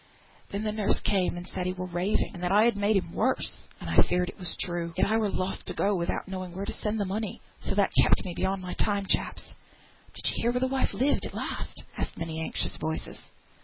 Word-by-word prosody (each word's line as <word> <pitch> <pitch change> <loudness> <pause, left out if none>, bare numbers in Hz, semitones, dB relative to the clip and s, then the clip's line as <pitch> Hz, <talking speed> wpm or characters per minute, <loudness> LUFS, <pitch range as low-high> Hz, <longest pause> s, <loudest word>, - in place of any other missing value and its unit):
Then 200 +2 -3
the 215 - 0
nurse 210 -1 +2
came, 185 -3 +2
and 175 - -6
said 180 -1 -3
he 185 - 0
were 185 0 -4
raving, 180 +3 0
and 180 - -8
that 180 0 0
I 210 +2 +6
had 235 -1 +4
made 205 +1 +2
him 175 -3 -2
worse. 260 - 0
And - - -7
I'm - - +4
afeard 180 0 +3
it - - -11
was 180 -3 -1
true; 170 -1 -2
yet - - +4
I 220 - +2
were 215 -2 +2
loth 185 0 -2
to - - -4
go 205 0 +2
without 170 +1 -1
knowing 185 -2 -5
where 195 +1 -3
to - - -3
send 215 +1 -2
the 200 - +1
money.... 205 +2 -3 0.2
So 195 - -2
that 200 -1 +3
kept - - +4
me 180 - -3
beyond 190 +2 -1
my 180 - -4
time, 200 -2 +1
chaps." - - 0 0.6
"Did - - -6
yo - - -1
hear 235 - +3
where 250 - +1
the 260 - +2
wife 265 0 0
lived 280 +3 +2
at - - -11
last?" - - -4 0.2
asked - - -3
many 160 -1 -3
anxious 95 - -1
voices. 160 0 -3
190 Hz, 245 wpm, -29 LUFS, 180-210 Hz, 0.6 s, I